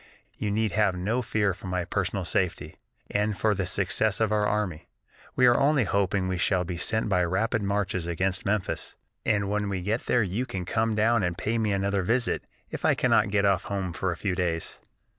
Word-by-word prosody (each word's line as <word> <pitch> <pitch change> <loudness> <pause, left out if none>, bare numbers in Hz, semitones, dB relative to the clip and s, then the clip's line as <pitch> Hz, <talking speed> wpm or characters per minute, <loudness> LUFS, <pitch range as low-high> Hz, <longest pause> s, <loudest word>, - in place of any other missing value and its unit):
You 105 - -3
need 110 +1 0
have 105 -3 +2
no 105 +8 -1
fear 105 -4 0
for 95 +1 -10
my 90 -1 -1
personal 95 0 -2
safety, 90 +1 -1 0.4
or 105 +1 +1
for 110 +2 +2
the 95 -2 -2
success 100 +2 +1
of 110 -1 +1
our 105 -1 +2
army. 105 -7 -2 0.5
We 125 - +4
are 120 -1 +5
only 140 -1 +3
hoping 100 -2 0
we 95 -1 -2
shall 95 -1 +2
be 90 -1 -5
sent 110 +6 0
by 90 -3 +2
rapid 100 +6 0
marches 100 -3 -1
against 90 +2 -1
Memphis, 105 -1 -2 0.3
and 100 -2 +2
when 105 0 -1
we 95 -2 -3
get 110 +5 -2
there 120 -2 +3
you 105 +7 -2
can 90 -2 -4
come 110 +3 0
down 115 +1 +3
and 90 -2 -1
pay 115 +4 -1
me 110 -2 +1
another 100 0 0
visit, 120 +6 0 0.3
if - - -6
I - - +4
cannot - - +3
get 100 0 +2
off 95 -3 +2
home 95 -3 -3
for 95 +2 -1
a 85 - -4
few 100 -3 -1
days." 85 -3 -2
100 Hz, 210 wpm, -27 LUFS, 95-110 Hz, 0.5 s, are